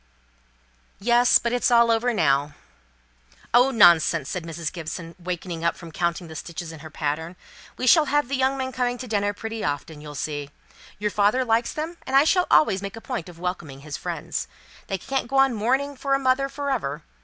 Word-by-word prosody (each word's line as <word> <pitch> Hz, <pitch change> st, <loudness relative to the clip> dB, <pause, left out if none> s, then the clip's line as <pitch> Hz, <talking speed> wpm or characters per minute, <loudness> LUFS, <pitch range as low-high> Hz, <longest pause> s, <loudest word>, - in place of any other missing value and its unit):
"Yes; 240 Hz, +4 st, +5 dB
but 235 Hz, 0 st, -2 dB
it's 245 Hz, -, +2 dB
all 235 Hz, -1 st, +5 dB
over 230 Hz, +2 st, +2 dB
now." 145 Hz, -7 st, +1 dB, 1.0 s
"Oh, 245 Hz, +3 st, +6 dB
nonsense!" 170 Hz, -, +5 dB
said 180 Hz, -3 st, -4 dB
Mrs. 165 Hz, -1 st, -4 dB
Gibson, 165 Hz, 0 st, -6 dB
wakening 175 Hz, -1 st, -5 dB
up 170 Hz, -, +1 dB
from 170 Hz, -2 st, -11 dB
counting 170 Hz, +1 st, -2 dB
the 160 Hz, -, -10 dB
stitches 165 Hz, +2 st, -6 dB
in 160 Hz, -, -10 dB
her 155 Hz, +1 st, -10 dB
pattern. 160 Hz, +3 st, -3 dB, 0.4 s
"We 255 Hz, -, -2 dB
shall 305 Hz, +5 st, +6 dB
have 290 Hz, -1 st, +1 dB
the 275 Hz, -, -1 dB
young 265 Hz, +1 st, +1 dB
men 260 Hz, -1 st, -3 dB
coming 245 Hz, -1 st, -1 dB
to 255 Hz, -, -7 dB
dinner 205 Hz, -2 st, 0 dB
pretty 225 Hz, +1 st, -6 dB
often, 150 Hz, +1 st, -3 dB
you'll 150 Hz, -1 st, -9 dB
see. 145 Hz, 0 st, -4 dB, 0.5 s
Your 210 Hz, +1 st, -1 dB
father 210 Hz, +6 st, +2 dB
likes 230 Hz, 0 st, +1 dB
them, 320 Hz, +3 st, -5 dB
and 265 Hz, -, -1 dB
I 275 Hz, -, +7 dB
shall 360 Hz, +3 st, +2 dB
always 155 Hz, +5 st, +4 dB
make 200 Hz, +1 st, -6 dB
a -, -, -8 dB
point 225 Hz, -8 st, -5 dB
of 175 Hz, -, -13 dB
welcoming 170 Hz, -6 st, -5 dB
his 150 Hz, 0 st, -6 dB
friends. 60 Hz, -, -4 dB, 0.4 s
They 195 Hz, -, -2 dB
can't 265 Hz, +7 st, -3 dB
go 270 Hz, +3 st, -1 dB
on 270 Hz, -1 st, +5 dB
mourning 265 Hz, +6 st, 0 dB
for 275 Hz, +1 st, 0 dB
a -, -, 0 dB
mother 270 Hz, +1 st, +1 dB
for 280 Hz, 0 st, -3 dB
ever. 150 Hz, -, -2 dB
205 Hz, 200 wpm, -24 LUFS, 165-255 Hz, 1.0 s, I